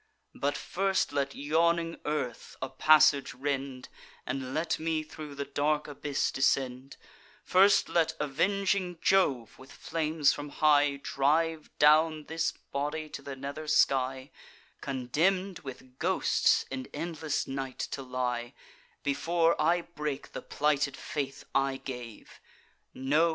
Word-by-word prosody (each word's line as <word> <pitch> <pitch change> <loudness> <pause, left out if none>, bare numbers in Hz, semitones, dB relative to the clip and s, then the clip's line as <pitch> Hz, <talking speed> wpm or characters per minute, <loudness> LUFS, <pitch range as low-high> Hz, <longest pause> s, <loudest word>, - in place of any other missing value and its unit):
But 145 +1 -1
first 195 +1 0
let 140 -1 -1
yawning 165 +3 +1
earth 145 -5 -3
a - - -4
passage 150 +1 +4
rend, 135 -1 -3 0.4
And 130 -1 -3
let 160 +3 -1
me 160 -1 -1
thro' 155 -1 -9
the 140 0 -3
dark 150 +2 0
abyss 145 -1 -2
descend; 135 0 0 0.5
First 195 +2 +5
let 165 -2 +1
avenging 185 +4 0
Jove, 135 - +2
with 130 +1 -13
flames 155 -2 +1
from 145 0 -6
high, 145 -1 +3
Drive 155 +3 +1
down 155 +1 +5
this 165 +1 -1
body 150 +2 -4
to - - -7
the 140 - -7
nether 140 +3 -6
sky, 130 -2 +2 0.5
Condemn'd 165 +9 0
with 130 -2 -11
ghosts - - +2
in 130 -1 -4
endless 160 -3 -2
night 135 -1 -5
to 140 - -4
lie, 125 -1 -3 0.5
Before 165 +4 +2
I 170 +3 +3
break 150 -5 -5
the - - -6
plighted 145 -2 0
faith 145 -5 -4
I 135 0 +1
gave! 125 -4 -9 0.6
No! 150 +6 +2
145 Hz, 125 wpm, -29 LUFS, 135-160 Hz, 0.6 s, First